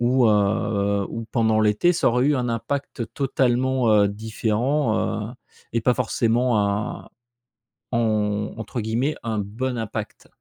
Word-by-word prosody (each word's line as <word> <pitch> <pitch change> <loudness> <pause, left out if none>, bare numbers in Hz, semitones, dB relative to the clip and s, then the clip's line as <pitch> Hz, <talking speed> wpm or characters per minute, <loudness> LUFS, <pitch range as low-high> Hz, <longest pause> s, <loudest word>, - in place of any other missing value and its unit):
ou, 125 0 +3
heu, 100 -1 +1
ou 115 0 -5
pendant 110 -3 +2
l'été 110 +12 +3
ça 165 - +2
aurait 125 +3 +2
eu 145 -1 +3
un 125 -1 -1
impact 120 +1 -3
totalement, 130 -2 +1
heu, 100 -1 +5
différent, 110 +4 -1
heu, - - -9 0.4
et 115 - +2
pas 125 - +4
forcément, 120 -1 +1
un 100 +1 -3 0.8
en 105 -3 0
entre 115 +2 -4
guillemets 120 +7 -1
un 110 -2 -2
bon 120 +5 -3
impact? 110 -2 -5
115 Hz, 140 wpm, -23 LUFS, 105-125 Hz, 0.8 s, heu